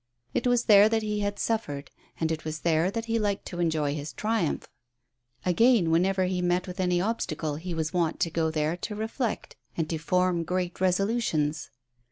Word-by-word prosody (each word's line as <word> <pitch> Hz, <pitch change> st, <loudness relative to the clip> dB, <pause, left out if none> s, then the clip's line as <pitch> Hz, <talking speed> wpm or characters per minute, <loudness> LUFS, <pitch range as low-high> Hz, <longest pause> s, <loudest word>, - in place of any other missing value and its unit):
It -, -, 0 dB
was 245 Hz, -1 st, +3 dB
there 210 Hz, -1 st, +7 dB
that 225 Hz, 0 st, +1 dB
he 210 Hz, -1 st, -1 dB
had 205 Hz, 0 st, -2 dB
suffered, 145 Hz, -11 st, -2 dB, 0.3 s
and 160 Hz, 0 st, 0 dB
it 160 Hz, -1 st, -3 dB
was 155 Hz, 0 st, -5 dB
there 165 Hz, +1 st, +2 dB
that 225 Hz, +3 st, -3 dB
he 230 Hz, 0 st, 0 dB
liked 205 Hz, -2 st, -1 dB
to 175 Hz, -, -6 dB
enjoy 155 Hz, -4 st, +1 dB
his 150 Hz, 0 st, -5 dB
triumph. 215 Hz, -7 st, -1 dB, 0.8 s
Again, 185 Hz, -1 st, +4 dB
whenever 185 Hz, +3 st, +2 dB
he 180 Hz, 0 st, 0 dB
met 175 Hz, 0 st, +1 dB
with 180 Hz, 0 st, -8 dB
any 180 Hz, -1 st, +2 dB
obstacle 160 Hz, -7 st, -2 dB
he 170 Hz, +2 st, -5 dB
was 160 Hz, +1 st, -2 dB
wont 170 Hz, -2 st, 0 dB
to 165 Hz, -, +1 dB
go 160 Hz, 0 st, +1 dB
there 155 Hz, +1 st, 0 dB
to 210 Hz, +4 st, -5 dB
reflect 220 Hz, +2 st, -3 dB, 0.2 s
and 165 Hz, -2 st, 0 dB
to 160 Hz, -, -2 dB
form 180 Hz, +1 st, +1 dB
great 180 Hz, +1 st, -2 dB
resolutions. 180 Hz, -6 st, +1 dB
180 Hz, 190 wpm, -27 LUFS, 160-210 Hz, 0.8 s, there